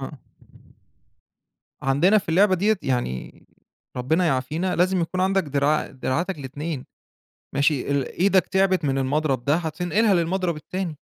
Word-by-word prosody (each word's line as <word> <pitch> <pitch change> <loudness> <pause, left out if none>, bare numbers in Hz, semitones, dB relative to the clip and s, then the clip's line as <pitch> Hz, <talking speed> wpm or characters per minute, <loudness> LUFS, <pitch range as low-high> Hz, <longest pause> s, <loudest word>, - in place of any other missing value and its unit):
آه. 135 -1 -8 1.6
عندنا 155 +11 +4
في 200 - -9
اللعبة 190 +4 +4
دِيَّة، 210 +4 +2
يعني 120 - -3 0.5
ربنا 160 +8 +1
يعافينا 155 +6 -1
لازم 185 +1 +2
يكون 175 +2 -2
عندك 190 +1 +2
دراع 145 0 +1
دراعاتك 155 +7 -2
الإتنين، 145 +1 -5 0.7
ماشي، 140 0 +2
ل 140 -2 +1
إيدك 190 +4 +2
تعبت 190 -2 +1
من 135 -1 +1
المضرب 135 -1 0
ده، 145 +2 +3
هتنقلها 175 +6 +1
للمضرب 175 0 0
التاني. 170 +1 -5
160 Hz, 130 wpm, -23 LUFS, 140-185 Hz, 1.6 s, عندنا